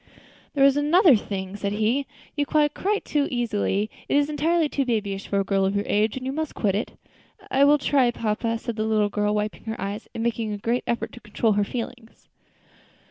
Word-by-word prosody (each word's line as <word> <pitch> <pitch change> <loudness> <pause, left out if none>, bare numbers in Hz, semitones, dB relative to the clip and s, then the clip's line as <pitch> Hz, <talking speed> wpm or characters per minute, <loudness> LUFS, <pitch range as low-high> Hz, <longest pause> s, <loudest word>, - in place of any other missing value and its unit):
"There 275 -1 +5
is 275 0 +5
another 305 - +5
thing," 195 -2 -4
said 200 0 -2
he. 225 +6 0 0.3
"You 290 - +1
cry 300 -1 +3
quite 410 +7 -2
too 290 -2 +1
easily; 215 -4 0 0.2
it - - +2
is 290 +1 +2
entirely 320 +2 +2
too 280 -1 -1
babyish 205 -5 -2
for 200 - 0
a - - +2
girl 195 0 +1
of 190 +1 +1
your 200 - 0
age; 210 +3 +1
you 260 +1 -3
must 310 +1 -3
quit 200 -3 +1
it." 210 +4 -2 0.6
"I 280 -4 +5
will 295 +1 +6
try, 275 -3 +3
papa," 230 0 -1
said 230 0 -5
the 215 - 0
little 215 -1 +2
girl, 210 0 0
wiping 210 +1 -3
her 220 0 -4
eyes, 200 +3 -4
and 225 - -2
making 230 -2 -1
a - - -3
great 235 +4 -1
effort 235 - -1
to 245 - -11
control 215 +1 0
her 205 0 +2
feelings. 230 +1 -7
230 Hz, 210 wpm, -24 LUFS, 210-275 Hz, 0.6 s, will